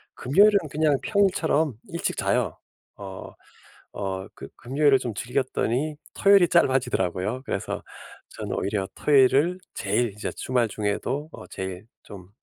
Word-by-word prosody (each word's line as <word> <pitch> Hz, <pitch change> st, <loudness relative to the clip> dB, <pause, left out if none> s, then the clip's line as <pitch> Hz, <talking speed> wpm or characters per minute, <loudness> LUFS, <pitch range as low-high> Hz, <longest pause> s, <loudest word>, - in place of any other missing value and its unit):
금요일은 200 Hz, +10 st, +5 dB
그냥 150 Hz, 0 st, +2 dB
평일처럼 170 Hz, -, +1 dB, 0.2 s
일찍 170 Hz, -, -3 dB
자요. -, -, 0 dB, 0.4 s
어 95 Hz, -2 st, -9 dB, 0.6 s
어 95 Hz, -1 st, -4 dB
그 -, -, -9 dB
금요일을 135 Hz, +2 st, +2 dB
좀 115 Hz, -4 st, -4 dB
즐겼더니 130 Hz, +4 st, -1 dB, 0.2 s
토요일이 195 Hz, -3 st, +5 dB
짧아지더라고요. 125 Hz, -, +1 dB
그래서 -, -, -4 dB, 0.5 s
저는 -, -, -7 dB
오히려 100 Hz, -1 st, -1 dB
토요일을 145 Hz, +5 st, +3 dB, 0.2 s
제일 120 Hz, -2 st, 0 dB
이제 105 Hz, -, -4 dB
주말 125 Hz, -3 st, 0 dB
중에도 110 Hz, +8 st, -2 dB
어 -, -, -10 dB
제일 95 Hz, +1 st, -6 dB, 0.2 s
좀 95 Hz, -3 st, -11 dB
130 Hz, 300 characters per minute, -25 LUFS, 105-155 Hz, 0.6 s, 금요일은